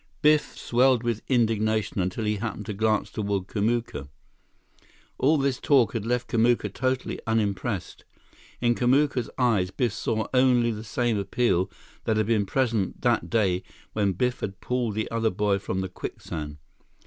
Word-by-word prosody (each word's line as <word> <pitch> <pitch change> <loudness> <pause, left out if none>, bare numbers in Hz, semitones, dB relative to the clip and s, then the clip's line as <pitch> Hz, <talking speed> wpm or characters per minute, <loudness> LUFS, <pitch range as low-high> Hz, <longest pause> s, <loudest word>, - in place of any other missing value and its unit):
Biff 150 0 +3
swelled 125 0 +3
with 115 -2 -1
indignation 110 -4 +1
until 95 +5 -2
he 105 0 0
happened 110 +2 -4
to 105 - -4
glance 110 +1 0
toward 100 -3 -2
Kamuka. 110 - -1 1.1
All 150 +4 +4
this 135 -2 0
talk 135 -6 +3
had 115 -2 -3
left 125 0 0
Kamuka 115 -3 +2
totally 130 0 -1
unimpressed. 105 -3 -1 0.6
In 120 -1 +3
Kamuka's 130 0 +2
eyes, 115 -8 +2
Biff 115 +3 -1
saw 110 +1 -1
only 125 -2 +4
the 110 0 -6
same 115 -1 0
appeal 100 -2 +1 0.4
that 110 - +1
had 110 - +2
been 105 -2 +1
present 115 -7 0
that 85 - +1
day 95 -3 +2 0.3
when 100 -3 +1
Biff 125 +7 0
had 100 0 -5
pulled 125 -4 -1
the 110 - 0
other 115 -1 +1
boy 100 0 +1
from 95 -1 -3
the 95 - -2
quicksand. 75 -4 -6
110 Hz, 155 wpm, -26 LUFS, 100-125 Hz, 1.1 s, All